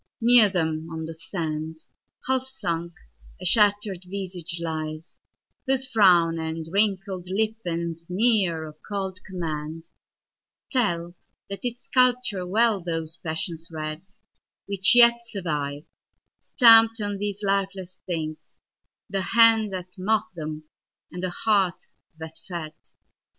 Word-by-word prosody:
Near 235 -2 +6
them 160 -3 -2
on 160 0 -5
the 165 - -6
sand, 160 -1 -5 0.5
Half 260 0 0
sunk, 170 -9 -3 0.5
a - - -8
shatter'd 205 -3 +3
visage 180 -3 -5
lies, 155 -1 -5 0.5
whose 265 0 +2
frownAnd 165 -7 +3
wrinkled 195 -2 0
lip 220 +3 0
and 170 -1 -2
sneer 180 0 +1
of 155 -1 -11
cold 190 -2 -4
commandTell 160 -2 -5 1.7
that 200 - -4
its 245 0 -4
sculptor 250 -7 +2
well 215 +1 +2
those 165 -1 -4
passions 165 0 -4
readWhich 190 +5 -1
yet 235 -1 +7
survive, 150 -8 -4 0.6
stamp'd 225 -2 +6
on 205 -1 -3
these 205 0 -3
lifeless 195 -2 -2
things, 155 -3 -5 0.5
The 195 -1 -2 0.2
hand 225 -2 +6
that 180 +1 -8
mock'd 195 -1 0
them 155 -2 -6 0.5
and 180 - -7
the 185 - -2
heart 195 -1 +1 0.3
that 160 0 -10
fed. 170 -4 -6
185 Hz, 115 wpm, -25 LUFS, 165-210 Hz, 1.7 s, yet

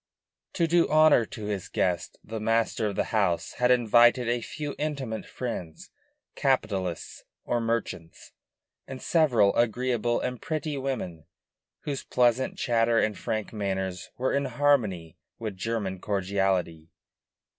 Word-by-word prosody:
To 170 - +2
do 170 +1 +3
honor 155 -6 +5
to 110 - -8
his 100 -3 -3
guest 90 -2 -1
the 110 0 -6
master 115 0 +1
of 100 - -3
the - - +1
house 100 -6 +1
had 125 0 +3
invited 120 0 +5
a 120 0 0
few 145 +4 -5
intimate 140 -7 -3
friends, 90 -10 -6 0.4
capitalists 100 - -1 0.2
or 120 - 0
merchants, 115 -8 -4 0.6
and 135 -1 -7
several 125 - +3
agreeable 120 0 +1
and 125 -2 -4
pretty 155 -1 -3
women, 110 - -4 0.5
whose 140 -3 -3
pleasant 125 +1 +1
chatter 115 -1 +2
and 110 -2 +2
frank 110 +1 -3
manners 95 -3 -3
were 130 +1 0
in 140 0 +1
harmony 110 - +1 0.2
with 110 -3 -5
German 95 -1 -3
cordiality. 95 -5 -1
115 Hz, 130 wpm, -27 LUFS, 95-130 Hz, 0.6 s, honor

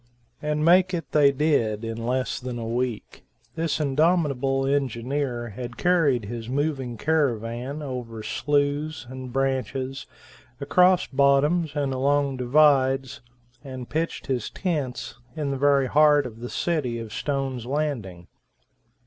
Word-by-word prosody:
And 150 0 -1
make 180 +2 +5
it 165 - -6
they 145 -2 +5
did. 120 -7 +1
In 115 +1 -4
less 130 +1 -1
than 125 -1 -5
a 115 - -4
week, 120 0 -3 0.3
this 160 +1 -1
indomitable 140 -3 +1
engineer 130 -2 -1
had 120 +2 -7
carried 150 - +2
his 115 +2 -6
moving 135 -3 -2
caravan 130 -1 -1
over 120 -5 -6
slues 145 +1 -1
and 130 -1 -7
branches, 135 0 -2 0.5
across 180 +6 +4
bottoms 140 +4 +2
and 140 -2 0
along 140 +1 +1
divides, 135 0 +3 0.4
and 130 -3 -7
pitched 165 +2 -2
his 125 -5 -2
tents 140 - -3 0.2
in 150 -3 -2
the 135 - -2
very 140 0 +3
heart 150 +1 +4
of 115 -2 -8
the 120 +1 -6
city 150 -9 -1
of 115 -2 -7
Stone's 135 -4 -3
Landing. 125 - -3
135 Hz, 130 wpm, -25 LUFS, 125-150 Hz, 0.5 s, make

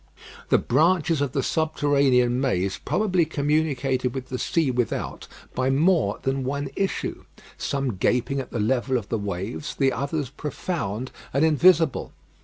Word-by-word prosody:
The - - +5
branches 160 +2 +2
of 140 -3 -1
the 135 - 0
subterranean 140 -5 +2
maze 95 -7 0
probably 185 -5 +2
communicated 140 -4 0
with 130 -1 -5
the 125 - -3
sea 160 -6 +1
without 125 -2 -2 0.3
by 130 +1 0
more 150 - +2
than 135 0 0
one 140 +2 -2
issue, 195 -1 -2 0.3
some 135 -7 -2
gaping 125 +7 +1
at 135 - -5
the 115 - -4
level 125 +4 +1
of 110 -4 -6
the 115 - -1
waves, 100 - -4
the 135 -1 +2
others 140 -1 -2
profound 130 - -4 0.2
and 140 +3 +4
invisible. 160 0 +3
135 Hz, 145 wpm, -24 LUFS, 125-155 Hz, 0.3 s, The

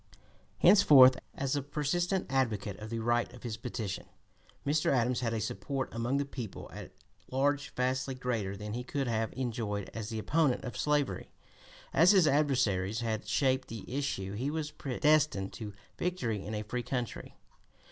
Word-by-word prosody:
Henceforth, 135 -10 +8 0.2
as 135 -1 -1
the 145 - +1
persistent 175 +7 -1
advocate 115 -7 0
of 105 0 -7
the 115 - -3
right 120 +1 +1
of 120 -2 -7
petition, 115 -5 -4 0.6
Mr. 150 +2 +2
Adams 125 -1 +2
had 120 -2 -1
a 115 - -1
support 110 +6 -3
among 120 +4 0
the 140 - 0
people 125 -7 -7
at - - -8 0.4
large 140 +2 +1
vastly 130 +1 0
greater 115 -6 -2
than 105 +1 -6
he 125 +2 -3
could 135 +1 -2
have 110 -1 0
enjoyed 115 -5 -3
as 110 -2 -5
the 110 - -4
opponent 145 +4 +1
of 125 - -6
slavery. 150 -2 0 0.6
As 175 +5 +6
his 190 -4 +6
adversaries 125 -8 +2
had 110 -2 -2
shaped 130 +3 +1
the 115 -3 -7
issue 100 -9 -2
he 125 +7 -2
was 150 -1 -3
predestined 145 -6 +1
to 105 -3 -7 0.2
victory 120 - -1
in 110 - -4
a 105 - -3
free 120 +4 -3
country. 125 -2 -4
125 Hz, 160 wpm, -31 LUFS, 110-140 Hz, 0.6 s, Henceforth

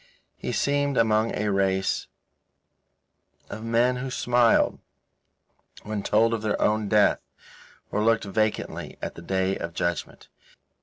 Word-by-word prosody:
He - - -5
seemed 145 -1 0
among 110 0 +2
a 105 0 -1
race 95 -1 0 1.4
of 110 +2 -6
men 120 +2 +2
who 130 +1 -4
smiled 120 -2 +2 1.0
when 105 -1 -3
told 115 +3 +2
of 115 - -2
their 110 -1 -1
own 105 -1 +1
death, 105 -1 +3 0.7
or 105 - 0
looked 115 0 +3
vacantly 110 +2 -2
at - - -5
the - - -11
Day 95 +2 -1
of 85 0 -6
Judgement. 85 -3 -3
110 Hz, 130 wpm, -25 LUFS, 100-115 Hz, 1.4 s, death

